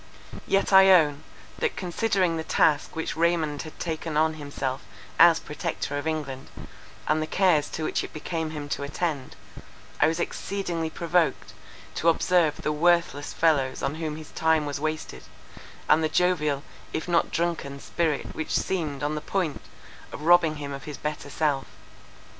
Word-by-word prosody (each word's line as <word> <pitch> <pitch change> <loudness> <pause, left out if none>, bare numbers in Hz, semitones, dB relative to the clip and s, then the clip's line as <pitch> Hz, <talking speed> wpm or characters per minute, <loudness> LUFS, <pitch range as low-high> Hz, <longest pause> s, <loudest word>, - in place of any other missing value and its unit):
Yet 195 0 +1
I 190 0 +8
own, 155 -6 +5 0.4
that 470 - 0
considering 185 -1 0
the 160 - -3
task 155 0 +2
which 160 - -3
Raymond 160 -3 +1
had 155 - -10
taken 160 -2 -3
on 160 +1 +3
himself 140 -3 -4 0.4
as - - +8
Protector - - -4
of 145 +2 -3
England, 140 -4 -4 0.6
and 155 +1 +2
the 155 - -2
cares 170 -5 +2
to 160 - -4
which - - -1
it - - -7
became 160 +1 -3
him 150 -2 -6
to - - -2
attend, 145 -1 -3 0.6
I - - +5
was 165 +2 -1
exceedingly 175 -3 -3
provoked 170 0 0 0.4
to 165 - +2
observe 165 -2 +2
the 150 - 0
worthless 160 -2 +2
fellows 140 -5 +1
on 140 - 0
whom 155 -2 -2
his 155 -1 -10
time 160 -1 +2
was 145 -1 -3
wasted, 155 - -4 0.7
and 160 +1 +4
the 155 - +1
jovial 150 -5 +1 0.3
if 160 - -3
not 170 -1 +2
drunken 165 -5 -2
spirit 160 -1 -2
which 160 - -1
seemed 155 -7 -2
on 150 +1 0
the 150 - -3
point 180 -5 -2 0.5
of 150 - -8
robbing 170 -1 +5
him 145 -1 -6
of 135 - -8
his 150 -2 -6
better 150 -1 -5
self. 145 -2 0
155 Hz, 165 wpm, -26 LUFS, 145-170 Hz, 0.7 s, I